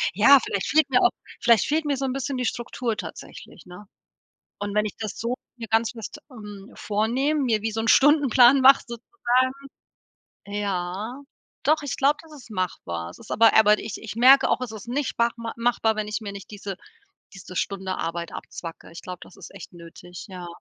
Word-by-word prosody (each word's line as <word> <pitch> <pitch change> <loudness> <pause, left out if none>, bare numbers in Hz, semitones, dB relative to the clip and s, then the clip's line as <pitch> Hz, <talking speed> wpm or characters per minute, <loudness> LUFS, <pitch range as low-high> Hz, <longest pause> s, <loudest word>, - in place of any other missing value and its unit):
ja, 265 +7 +7
vielleicht 200 - -2
fehlt 305 -2 +3
mir 250 - +4
auch 365 - +5 0.3
vielleicht 235 -3 +4
fehlt 310 +1 0
mir 285 -1 0
so 270 - -2
'n 260 - -2
bisschen 270 0 -3
die 250 - -2
Struktur 235 -1 -3
tatsächlich, - - -10
ne? 180 +4 -12 0.7
Und 205 0 -4
wenn 210 0 +2
ich 210 - -6
das 215 -3 -5
so 235 +2 -2 0.2
mir 230 -2 -8
ganz 225 0 +2
fest, 230 +5 -8
ähm, 210 -2 -11
vornehme, 245 +9 0
mir 225 -5 +1
wie 220 0 -2
so 225 - -3
'n 225 - -2
Stundenplan 275 -2 +6
mach 270 +1 +7
sozusagen, 255 - -1 0.9
ja. 200 +4 -4 0.4
Doch, 310 0 +3
ich 285 - -4
glaube, 280 +2 +3
das 320 -1 -17
ist 275 -5 -13
machbar. 85 - -4
Es - - -14
ist - - -10
aber 225 0 +5
aber 210 -1 +6
ich 215 - -6
ich 220 -1 -7
merke 260 +4 +6
auch, - - +1
es 250 -3 -4
ist 215 0 -9
nicht 265 +2 -3
machma 235 -1 -1
machbar, 230 -2 +1
wenn 215 -1 -2
ich 215 +2 -3
mir 205 -2 -6
nicht 200 -1 -10
diese 200 -2 -6 0.6
diese 185 -1 -11
Stunde 190 0 -2
Arbeit 170 0 -4
abzwacke. 165 -2 -9
Ich 170 - -11
glaube, 180 -1 -7
das - - -14
ist - - -12
echt - - -11
nötig, 175 +1 -11
ja. 180 -2 -8
225 Hz, 200 wpm, -24 LUFS, 200-260 Hz, 0.9 s, ja